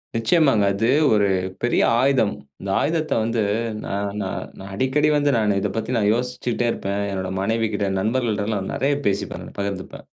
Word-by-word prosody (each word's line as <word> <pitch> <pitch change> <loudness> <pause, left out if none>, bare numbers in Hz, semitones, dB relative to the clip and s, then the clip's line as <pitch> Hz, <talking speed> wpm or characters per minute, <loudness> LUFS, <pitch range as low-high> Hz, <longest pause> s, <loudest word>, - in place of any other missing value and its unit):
நிச்சயமாங்க. 125 - +3
அது 110 +4 0 0.3
ஒரு 105 -1 +3 0.4
பெரிய 120 - +2 0.2
ஆயுதம். 130 -5 +3 0.3
இந்த 100 - -5
ஆயுதத்தை 160 0 0
வந்து 115 0 0 0.4
நா - - -5 0.3
நா 95 - -2 0.3
நான் 95 +1 -9
அடிக்கடி 130 +7 +2
வந்து 145 0 +2
நானு 105 -3 +2
இதை 105 - 0
பத்தி 110 +2 -2
நான் 105 -1 +2
யோசிச்சுட்டே 125 0 -2
இருப்பேன். 100 +1 -3
என்னோட 95 -1 -3
மனைவி 115 +3 +1
கிட்ட, 100 -1 0
நண்பர்கள்டெல்லாம் 110 -3 -1
நெறையா 140 +1 +1
பேசிப்பேன் 100 0 -1
நான் - - -12
பகிர்ந்துப்பேன். 100 -1 -5
110 Hz, 160 wpm, -22 LUFS, 100-125 Hz, 0.4 s, நிச்சயமாங்க